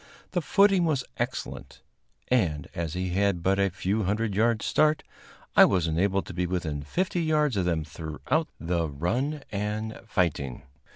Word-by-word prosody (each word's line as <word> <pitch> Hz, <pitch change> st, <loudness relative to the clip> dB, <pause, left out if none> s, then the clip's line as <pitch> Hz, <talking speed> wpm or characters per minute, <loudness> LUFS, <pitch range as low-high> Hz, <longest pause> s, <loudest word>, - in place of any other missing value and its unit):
The 180 Hz, -, 0 dB
footing 195 Hz, +1 st, +4 dB
was 145 Hz, -6 st, +1 dB
excellent, -, -, -4 dB, 0.5 s
and, 80 Hz, -, +1 dB
as 85 Hz, -1 st, -3 dB
he 90 Hz, 0 st, -2 dB
had 95 Hz, -2 st, +1 dB
but 95 Hz, +2 st, +2 dB
a 100 Hz, 0 st, +3 dB
few 95 Hz, +4 st, -1 dB
hundred 105 Hz, +2 st, 0 dB
yards' 110 Hz, +2 st, +2 dB
start, 155 Hz, 0 st, +3 dB, 0.5 s
I -, -, +9 dB
was 90 Hz, -4 st, +2 dB
enabled 95 Hz, +4 st, +1 dB
to -, -, -8 dB
be 90 Hz, 0 st, -1 dB
within 85 Hz, -5 st, -2 dB
fifty 175 Hz, -, -1 dB
yards 150 Hz, -5 st, +2 dB
of 95 Hz, -3 st, +1 dB
them 85 Hz, -3 st, 0 dB
throughout 80 Hz, -, -2 dB
the 85 Hz, -1 st, 0 dB
run 125 Hz, -, -1 dB
and 105 Hz, +2 st, -3 dB
fighting. 75 Hz, -, -1 dB
100 Hz, 160 wpm, -27 LUFS, 85-125 Hz, 0.5 s, I